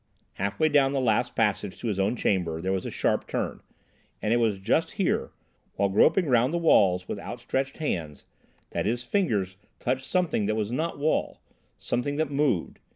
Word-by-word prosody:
Half 100 +1 -3
way 155 - +4
down 140 -2 +3
the 140 - +1
last 120 -1 +1
passage 105 -3 0
to - - -5
his 100 -3 -1
own 95 +5 +1
chamber 90 -8 0
there 95 +3 -2
was 95 -1 -1
a - - -3
sharp - - 0
turn, - - -3 0.6
and 110 - 0
it - - +4
was 110 -4 +1
just 95 - 0
here, - - 0 0.5
while 100 - +1
groping 160 - +4
round 125 -1 +3
the 170 - 0
walls 95 - +4
with - - -4
outstretched 135 +1 -3
hands, 80 - -3 0.5
that - - -1
his 120 +2 -1
fingers 105 - 0 0.2
touched 130 +1 -2
something 175 - +1
that 110 - 0
was 110 0 -2
not 160 +6 -2
wall—something 145 -2 -3
that 155 -1 -1
moved. 140 - 0
115 Hz, 180 wpm, -27 LUFS, 100-145 Hz, 0.6 s, way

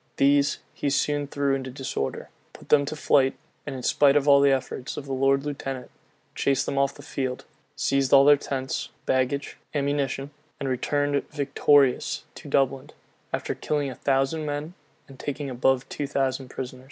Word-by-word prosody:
These 140 +1 +3 0.2
he 145 - -1
soon 145 +1 0
threw 140 -1 0
into 130 -1 -2
disorder; 130 - -4 0.2
put - - -15
them 145 -1 +5
to 150 - -4
flight, 135 -3 +3 0.3
in 135 -3 -5
spite 140 +2 +4
of 145 0 +2
all 140 -1 +7
the 140 - +5
efforts 130 -1 -2
of 145 - -5
the 135 - -4
lord 135 +1 +2
lieutenant; 135 -3 -5 0.4
chased 135 -1 +1
them 140 - -1
off 140 0 +1
the - - -12
field; 130 -2 -4 0.3
seized 135 -1 +1
all 140 0 +8
their 145 0 +8
tents, 135 -2 -3 0.2
baggage, 130 +2 0 0.2
ammunition; 140 -1 -1 0.3
and 140 - -3
returned 145 +2 0
victorious 145 -2 +2
to - - -11
Dublin, 135 +1 +1 0.4
after - - -2
killing 145 -3 -2
a - - -8
thousand 135 +3 0
men, 150 +2 -4 0.3
and 135 -1 -14
taking 145 -1 -4
above 130 +1 +1
two 145 - -4
thousand 135 -2 -1
prisoners. 130 -1 -6
140 Hz, 165 wpm, -25 LUFS, 135-145 Hz, 0.4 s, all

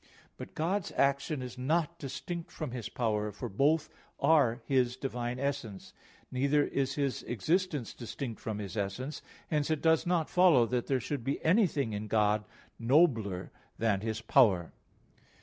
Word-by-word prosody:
But - - -10
God's 180 +4 -1
action 140 0 +1
is 125 0 -8
not 165 +5 0
distinct 165 +5 -5
from 155 -5 -5
His 120 -3 -5
power, 105 -3 -1
for 100 - -6
both 150 +9 +2 0.3
are 140 -6 +3
His 125 -2 +2
divine 125 -2 -3
essence; 135 -8 -4 0.4
neither 140 +3 +2
is 135 -2 -1
His 140 -3 -1
existence 150 - -1
distinct 120 0 -6
from 110 -2 -3
His 100 0 -6
essence. 110 +8 -3 0.3
Hence 150 -1 +1
it 155 -2 -1
does 160 0 +3
not 175 -3 +1
follow 175 -10 +5
that 125 0 -2
there 135 -2 +1
should 135 +1 -4
be 135 +3 -1
anything 160 - +2
in 105 +1 -4
God 105 -1 +2 0.3
nobler 115 - +2 0.3
than 110 -4 +1
His 110 0 -3
power. 105 - +3
130 Hz, 150 wpm, -31 LUFS, 115-150 Hz, 0.4 s, follow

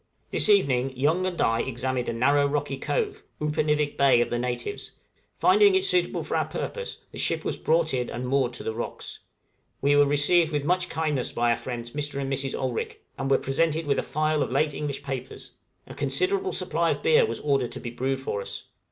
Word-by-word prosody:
This - - +3
evening 135 -10 +3
Young 160 +8 +2
and 180 -2 -4
I 115 0 +2
examined 130 0 -2
a - - -1
narrow 140 +5 +3
rocky 140 -1 -2
cove 430 - -2 0.2
Upernivik 150 -1 0
Bay 135 -3 +5
of 120 - 0
the 120 - 0
natives; 125 - -4 0.4
finding 400 +2 +5
it 380 0 +2
suitable 365 -2 +1
for - - -3
our - - +1
purpose, 485 0 -5
the - - -8
ship - - 0
was - - -1
brought 160 -1 +1
in 125 -2 -1
and 125 +1 -4
moored 130 -2 +1
to 120 - -5
the 110 - -2
rocks. 115 - -6 0.6
We 145 +1 +3
were 145 0 +5
received 155 +4 +3
with 145 -2 -1
much 180 +2 +1
kindness 150 -6 -1
by 120 0 +1
our - - +3
friends, 120 0 -6
Mr. 145 0 -4
and 135 0 -2
Mrs. 135 0 -2
Olrik, 130 -3 -3 0.2
and 135 +1 -2
were 135 - +5
presented 160 +3 0
with 140 -1 +1
a - - +2
file 155 0 0
of - - -1
late 155 -1 +1
English 145 -2 -4
papers. 135 -2 -6 0.3
A - - -10
considerable 385 0 0
supply - - 0
of - - -2
beer 470 +1 +5
was - - -3
ordered 135 -4 0
to - - -6
be 120 - -6
brewed 130 +2 -2
for 100 -6 -3
us. - - -6
140 Hz, 210 wpm, -26 LUFS, 130-160 Hz, 0.6 s, Bay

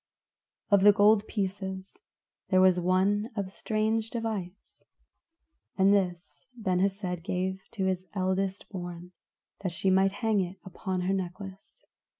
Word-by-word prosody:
Of 200 -1 +6
the 205 +1 +8
gold 210 +1 +4
pieces 190 -2 -4 0.5
there 185 - +4
was 185 -1 +5
one 190 +5 +2
of 200 -3 -3
strange 220 +2 -1
device, 215 -6 -5 1.0
and 195 +1 +5
this 180 -3 -1
Ben 185 -5 0
Hesed 190 -2 -1
gave 190 +1 -2
to 195 -4 -1
his 185 0 -1
eldest 190 +1 -1
born, 175 -2 -7 0.5
that 185 -3 -2
she 190 +3 0
might 190 +1 +3
hang 220 0 +1
it 185 0 -3
upon 185 0 -3
her 185 +2 0
necklace. 195 - -6
190 Hz, 135 wpm, -29 LUFS, 185-205 Hz, 1.0 s, the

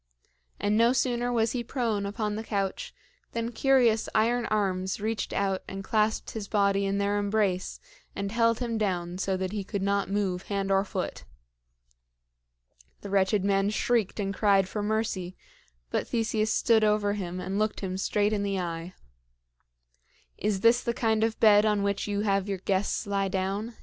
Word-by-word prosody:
And 205 +1 +1
no 235 +2 +5
sooner 245 -1 0
was 230 -2 +1
he 245 -2 -2
prone 230 -5 -1
upon 210 0 -2
the 220 - -4
couch 195 -3 -2 0.4
than 230 0 -2
curious 240 -3 +3
iron 235 +2 +2
arms 190 -3 -1
reached 220 +1 -2
out 195 -1 0
and 195 0 -6
clasped 215 +2 0
his 215 -3 -5
body 200 -1 +2
in 195 0 0
their 200 +1 +1
embrace 205 -3 0 0.4
and 200 0 -3
held 230 0 +2
him 230 -2 -2
down 180 -3 -2
so 190 0 0
that 185 0 -3
he 205 -1 -3
could 200 0 -4
not 200 0 0
move 195 -3 -1
hand 195 -1 -1
or 195 0 +3
foot. 200 - -4 1.8
The 200 - -7
wretched 195 0 +2
man 195 0 +2
shrieked 220 -1 0
and 195 -1 -1
cried 195 -2 +3
for 210 +2 -4
mercy; 205 -4 -2 0.5
but - - -1
Theseus 220 -2 0
stood 225 -1 +3
over 210 -1 +2
him 185 -3 -4
and 190 +2 -3
looked 215 0 -1
him 185 -2 -3
straight 205 +2 +1
in 205 - 0
the 200 -1 -1
eye. 170 0 -5 1.4
"Is 205 -3 -1
this 235 +2 +5
the 235 -1 -2
kind 220 -2 +1
of 225 0 -1
bed 210 -1 +6
on 210 -2 +2
which 200 0 -1
you 205 0 -1
have 200 -1 0
your 195 - -1
guests 190 +1 -1
lie 200 -1 0
down?" 195 +4 -2
205 Hz, 175 wpm, -27 LUFS, 195-220 Hz, 1.8 s, bed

